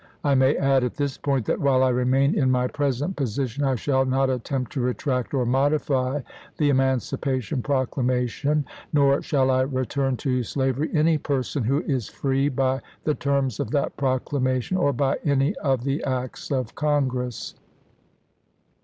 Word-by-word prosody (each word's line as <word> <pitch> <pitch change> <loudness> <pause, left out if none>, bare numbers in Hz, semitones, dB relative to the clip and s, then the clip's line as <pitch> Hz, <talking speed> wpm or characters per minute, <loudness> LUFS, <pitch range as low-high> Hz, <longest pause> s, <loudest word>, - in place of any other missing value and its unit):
I 145 - +3
may 130 +2 +4
add, 135 -2 +3
at 125 - -2
this 140 -2 -2
point, 135 -5 -1
that - - 0
while 130 -2 +3
I 130 - +4
remain 130 +3 +2
in 130 -3 +2
my 125 -1 +2
present 145 +5 -1
position 135 0 -2
I 135 -1 +2
shall 130 +2 +1
not 135 0 +1
attempt 125 0 -3
to 135 - -2
retract 125 0 -1
or 130 -3 0
modify 135 +1 +1 0.4
the 145 -2 +3
Emancipation 130 -2 0
Proclamation, 130 +2 0 0.3
nor 140 -2 +3
shall 135 -3 +1
I 130 0 +3
return 130 0 -1
to 125 -1 0
slavery 135 +4 -1
any 155 0 +3
person 135 -1 -2
who 140 +7 +1
is 130 -7 -1
free 135 +1 0
by 135 0 0 0.2
the 150 - +1
terms 140 -5 -1
of - - -2
that 140 - -1
proclamation 130 +2 0
or 175 -6 +2
by 135 +1 0
any 140 +3 +2
of 135 -4 0
the 140 +3 -1
acts 130 -2 -3
of 130 -5 -2
Congress." 130 -5 -1
135 Hz, 160 wpm, -24 LUFS, 130-140 Hz, 0.4 s, may